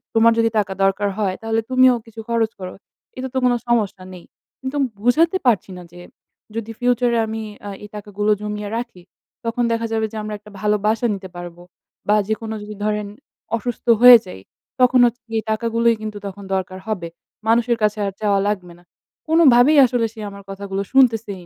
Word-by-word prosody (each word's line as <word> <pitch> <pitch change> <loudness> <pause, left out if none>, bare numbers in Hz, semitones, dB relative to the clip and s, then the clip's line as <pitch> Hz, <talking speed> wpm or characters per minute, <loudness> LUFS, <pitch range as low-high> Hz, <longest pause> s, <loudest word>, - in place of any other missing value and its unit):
তোমার 230 +1 +6
যদি 230 0 +3
টাকা 200 -2 0
দরকার 195 +1 +1
হয়, 195 -3 0
তাহলে 225 0 0
তুমিও 255 -1 +5
কিছু 225 0 -13
খরচ 230 -1 +1
করো। 185 -1 -6 0.4
এতে 260 - -4
তো 265 - -2
কোনো 245 -1 +3
সমস্যা 205 -5 0
নেই।" 180 -2 -12 0.4
কিন্তু 265 +2 -4 0.2
বুঝাতে 320 - +3
পারছি 220 -5 +2
না, 180 - -9
যে 175 - -13 0.6
যদি 225 0 -4
ফিউচার 245 0 +2
এ - - +2
আমি 220 0 -4 0.3
আ - - -4
এই 210 - -9
টাকাগুলো 210 0 -2
জমিয়ে 210 -1 -4
রাখি, 235 -6 -6 0.4
তখন 230 +1 -1
দেখা 230 0 0
যাবে 220 0 +1
যে - - -10
আমরা 215 - -5
একটা 210 0 -16
ভালো 210 +1 +2
বাসা 225 +3 +1
নিতে 190 -1 -9
পারবো 175 0 -9 0.5
বা - - +5
যেকোনো 220 0 -3
যদি 210 0 -8
ধরেন 210 -1 -1 0.5
অসুস্থ 240 +1 -5 0.2
হয়ে 245 -1 +11
যাই, 180 - -10 0.4
তখন 250 0 +5
হচ্ছে 240 0 -1 0.2
এই - - 0
টাকাগুলোই 230 +1 +1
কিন্তু 215 -1 -5
তখন 200 +1 -9
দরকার 185 0 -4
হবে। 190 -6 -3 0.4
মানুষের 235 +1 +3
কাছে 210 0 +2
আর 195 - -2
চাওয়া 200 -2 +2
লাগবে 180 -4 -3
না। - - -22 0.4
কোনোভাবেই 300 -3 +5
আসলে 245 -2 0
সে 225 - -13
আমার 200 0 -11
কথাগুলো 195 0 -4
শুনতেছেই 225 -8 +2
220 Hz, 185 wpm, -20 LUFS, 200-235 Hz, 0.6 s, হয়ে